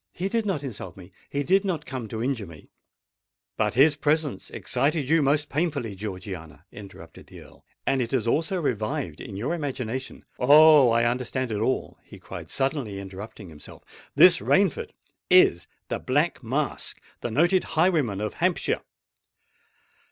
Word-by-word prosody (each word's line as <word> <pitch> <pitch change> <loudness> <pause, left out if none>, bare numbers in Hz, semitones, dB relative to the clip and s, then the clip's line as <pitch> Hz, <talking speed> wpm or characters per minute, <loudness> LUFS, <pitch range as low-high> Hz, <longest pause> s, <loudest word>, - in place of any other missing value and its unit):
He 185 +3 -3
did 225 0 -1
not 165 -8 -1
insult 100 -9 -7
me—he 95 +10 -6
did 190 +6 +3
not 170 -6 -2
come 130 -4 -5
to 110 +1 -4
injure 120 -6 -2
me——" 80 -3 -14 0.8
"But 105 0 0
his 145 +3 +5
presence 150 -1 -1
excited 145 -1 -1
you 160 +2 +3
most 145 +2 +2
painfully, 145 -9 -2
Georgiana!" 95 -5 -8
interrupted 100 -2 -12
the - - -12
Earl; - - -17 0.2
"and 135 -1 +1
it 115 - -2
has 130 -3 0
also 165 +9 0
revived 140 0 -2
in 105 -7 -8
your 115 - -2
imagination——Oh! 140 +1 +3
I 115 0 +3
understand 125 +1 -1
it 105 - -2
all!" 130 +4 -2
he - - -14
cried, - - -9
suddenly 135 -7 -2
interrupting 100 0 -9
himself: 75 -2 -13 0.3
"this - - +7
Rainford - - +1 0.4
is 85 - +5 0.2
the - - -2
Black 145 +6 0
Mask—the 130 -1 -4
noted 175 - +3
highwayman 155 - +2
of 105 -1 -3
Hampshire!" - - 0
130 Hz, 145 wpm, -25 LUFS, 105-155 Hz, 0.8 s, this